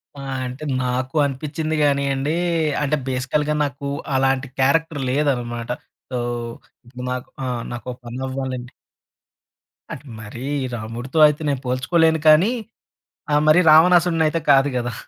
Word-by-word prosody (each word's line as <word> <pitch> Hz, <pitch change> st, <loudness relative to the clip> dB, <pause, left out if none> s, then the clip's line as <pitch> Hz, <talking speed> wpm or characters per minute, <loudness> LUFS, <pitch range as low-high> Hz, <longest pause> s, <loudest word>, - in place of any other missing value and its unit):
ఆ! -, -, -10 dB, 0.3 s
అంటే, 130 Hz, +5 st, -8 dB, 0.2 s
నాకు 130 Hz, +3 st, -2 dB
అనిపించింది 155 Hz, +3 st, -3 dB
గానియండి. 140 Hz, +1 st, +1 dB, 0.5 s
అంటే, 150 Hz, +1 st, +1 dB
బేసికల్‌గా 145 Hz, +4 st, 0 dB
నాకు 140 Hz, 0 st, -4 dB, 0.3 s
అలాంటి 135 Hz, +1 st, +1 dB
క్యారెక్టర్ 145 Hz, +2 st, +2 dB
లేదన్నమాట. 120 Hz, -5 st, -1 dB, 0.4 s
సో, 125 Hz, -, -2 dB, 0.7 s
ఇప్పుడు 125 Hz, +1 st, -9 dB
నాకు, 125 Hz, -1 st, -5 dB, 0.2 s
ఆహ్, 120 Hz, -2 st, -3 dB
నాకు 120 Hz, +1 st, -6 dB
పని 120 Hz, +2 st, -7 dB
అవ్వాలండి 130 Hz, -2 st, -4 dB, 1.2 s
అంటే, 145 Hz, -, -8 dB
మరీ 115 Hz, +4 st, -8 dB, 0.3 s
రాముడితో 120 Hz, +7 st, -4 dB
అయితే 150 Hz, +1 st, -2 dB
నేను 135 Hz, -2 st, -1 dB
పోల్చుకోలేను 160 Hz, +6 st, +2 dB
కానీ, 165 Hz, +9 st, +6 dB, 0.8 s
ఆహ్, 150 Hz, -, +4 dB
మరి 175 Hz, -, +6 dB
రావణాసురుడిని 165 Hz, 0 st, +5 dB
అయితే 165 Hz, -, -1 dB
కాదు 135 Hz, +1 st, +5 dB
గదా. 120 Hz, -1 st, -2 dB
135 Hz, 125 wpm, -21 LUFS, 125-155 Hz, 1.2 s, కానీ